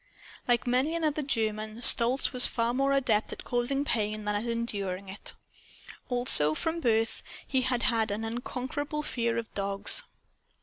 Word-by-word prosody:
Like 240 -1 +1
many 255 +6 0
another 310 -2 -1
German, 220 -4 -3
Stolz 245 +4 +6
was 250 -1 +5
far 235 0 -2
more 275 +2 0
adept 245 -6 0
at - - -10
causing 250 +4 -1
pain 215 -3 -2
than 210 - -1
at 205 +2 -3
enduring 200 -5 -4
it. 195 - -5 0.7
Also, 245 - +6
from 325 - -3
birth, 225 -5 0 0.3
he 260 -1 0
had 245 -1 +1
had 225 -2 +1
an 210 +2 -4
unconquerable 260 +6 -5
fear 235 -4 -2
of 230 -1 -6
dogs. 200 - 0
235 Hz, 155 wpm, -28 LUFS, 215-260 Hz, 0.7 s, Stolz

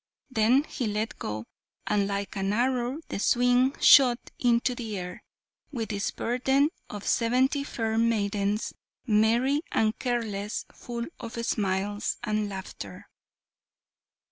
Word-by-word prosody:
Then 245 +4 +4
he 255 -5 -4
let 210 +1 -2
go, 105 +1 -4 0.4
and 205 -1 +1
like 200 0 -3
an 195 0 0
arrow 250 +4 0
the - - -3
swing 245 +4 +3
shot 255 -4 +6
into 245 0 +2
the 225 -4 -5
air, 180 -1 -6 0.5
with 230 -6 -3
its 200 -1 -1
burden 265 +4 +1 0.2
of 205 -1 -7
seventy 260 +4 +2
fair 225 -5 -1
maidens, 210 -2 0 0.3
merry 235 +6 +3
and 220 0 +2
careless, 220 -5 -2
full 235 -1 -5
of 230 -1 -7
smiles 205 0 -1
and 215 -2 -1
laughter. 190 -1 -8
225 Hz, 120 wpm, -27 LUFS, 205-245 Hz, 0.5 s, shot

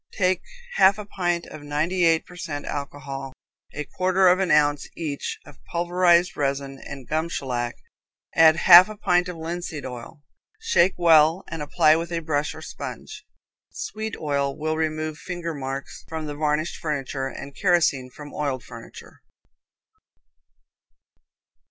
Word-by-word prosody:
Take 185 -2 +1 0.4
half 195 +1 +6
a 210 - -7
pint 175 -4 -1
of 155 - -10
ninety 155 +5 0
eight 165 -1 +3
per 180 - -14
cent 160 -5 -5
alcohol, 140 -1 -6 0.4
a 150 - -4
quarter 185 +4 +2
of 180 +1 +4
an 190 -2 0
ounce 145 -1 +3
each 150 -4 -4
of 140 - -16
pulverized 175 0 +2
resin 140 -1 -2
and 135 -3 -9
gum 160 +2 -1
shellac, 120 -6 -3 0.6
add 160 -1 +7
half 175 +3 +9
a 215 - -8
pint 180 -3 +2
of 175 - -6
linseed 165 -2 -5
oil, 130 +4 -9 0.4
shake 445 - +3
well 165 0 +5
and 165 -2 -5
apply 155 +1 +4
with 170 +1 -4
a 170 - -1
brush 150 -2 -1
or - - -10
sponge. - - -8 0.4
Sweet 220 - -5
oil 140 -2 -1
will 155 +1 -1
remove 155 -1 -2
finger 175 -2 -5
marks 135 -1 -6
from 160 -1 -5
varnished 150 +2 -1
furniture, 135 -3 -3
and 140 +1 -9
kerosene 170 -9 +2
from 145 +3 -11
oiled 140 -4 -2
furniture. - - -12
155 Hz, 145 wpm, -24 LUFS, 145-175 Hz, 0.6 s, half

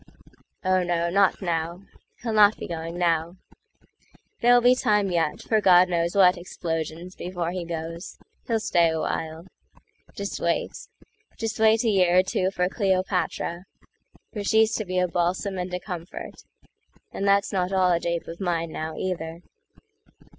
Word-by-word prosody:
O 185 0 +3
no, 170 -1 0
not 195 +1 +2
now! 170 +1 -2 0.4
He'll 230 -2 -2
not 210 0 +5
be - - -6
going 165 0 -5
now:There'll 175 +7 -2
be 245 +1 +5
time 210 -5 +1
yet 165 -3 -1
for 220 -1 +1
God 180 -2 +6
knows 170 0 0
what 185 -2 +6
explosionsBefore 175 +1 -4
he 185 -1 -3
goes. 165 +1 -6 0.3
He'll 230 -2 +1
stay 170 -5 +2
awhile. 160 +1 -3 0.7
Just 200 0 -4
wait:Just 225 - -5
wait 220 +1 +4
a 230 - +2
year 180 -3 +3
or 185 - +6
two 185 0 0
for 180 -2 0
Cleopatra, 185 -3 -1 0.7
For 210 - -4
she's 220 +2 +3
to 215 - -3
be 185 0 -3
a 180 0 +2
balsam 180 +3 -1
and 180 0 -4
a 180 - -2
comfort; 180 -2 -8 0.7
And 200 - -3
that's 200 +1 +2
not 185 -1 0
all 185 -1 +3
a 170 - +2
jape 170 0 -3
of 170 +3 -8
mine 170 -3 -1
now, 155 0 -5
either. 170 -2 -4
180 Hz, 145 wpm, -25 LUFS, 170-200 Hz, 0.7 s, God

